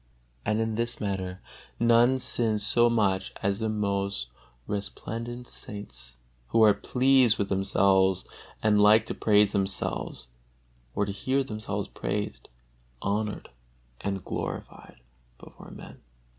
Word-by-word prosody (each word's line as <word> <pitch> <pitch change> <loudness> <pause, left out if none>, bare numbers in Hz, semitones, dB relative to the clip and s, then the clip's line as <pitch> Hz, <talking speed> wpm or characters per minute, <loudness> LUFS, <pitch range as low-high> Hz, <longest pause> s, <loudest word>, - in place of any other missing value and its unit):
And 105 +1 0
in 115 0 0
this 115 +2 -1
matter 95 -2 -3 0.4
none 120 +2 +5
sin 115 -4 0
so 120 +3 +3
much 100 -5 +1
as 100 +1 0
the 110 -1 -1
most 100 - -1 0.4
resplendent 115 +4 -5
saints, 65 - -9 0.3
who 115 - +4
are 105 -1 +7
pleased 125 +2 +3
with 100 - -1
themselves 95 -1 +3 0.4
and 105 -1 +4
like 105 +1 +6
to - - -4
praise 105 -1 +3
themselves 95 - -2 0.7
or 105 - +1
to 100 - -3
hear 130 +7 0
themselves 110 -4 -4
praised, - - -4 0.5
honored 105 - -2 0.5
and 100 -2 -3
glorified - - -6 0.4
before - - -14
men. - - -12
105 Hz, 120 wpm, -27 LUFS, 100-115 Hz, 0.7 s, are